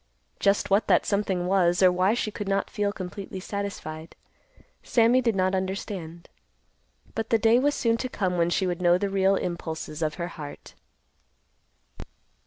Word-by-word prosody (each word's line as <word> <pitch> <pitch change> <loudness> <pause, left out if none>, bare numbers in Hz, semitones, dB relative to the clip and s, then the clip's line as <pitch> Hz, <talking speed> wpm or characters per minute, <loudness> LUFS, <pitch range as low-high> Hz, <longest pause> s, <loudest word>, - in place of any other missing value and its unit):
Just 200 0 +1
what 200 +3 +3
that - - +4
something 195 -3 0
was, 180 -1 +2
or 185 - +7
why 185 +4 +2
she 220 -3 -2
could 205 -1 -6
not 195 0 0
feel 205 -1 0
completely 190 -1 -7
satisfied, 185 -5 -6 0.7
Sammy 240 +2 +3
did 230 -4 +1
not 185 0 +1
understand. 185 -3 -4 0.9
But 225 0 -3
the 225 - +4
day 225 +2 +4
was 290 +2 +1
soon 230 -1 +1
to 255 +2 -4
come 185 -6 -1
when 170 -1 +2
she 190 +2 +1
would 180 -1 -2
know 175 0 +4
the 200 +1 -2
real 195 0 +3
impulses 160 -3 -4
of 155 -1 -1
her 175 -1 -4
heart. 150 -4 -10
190 Hz, 165 wpm, -26 LUFS, 175-205 Hz, 0.9 s, or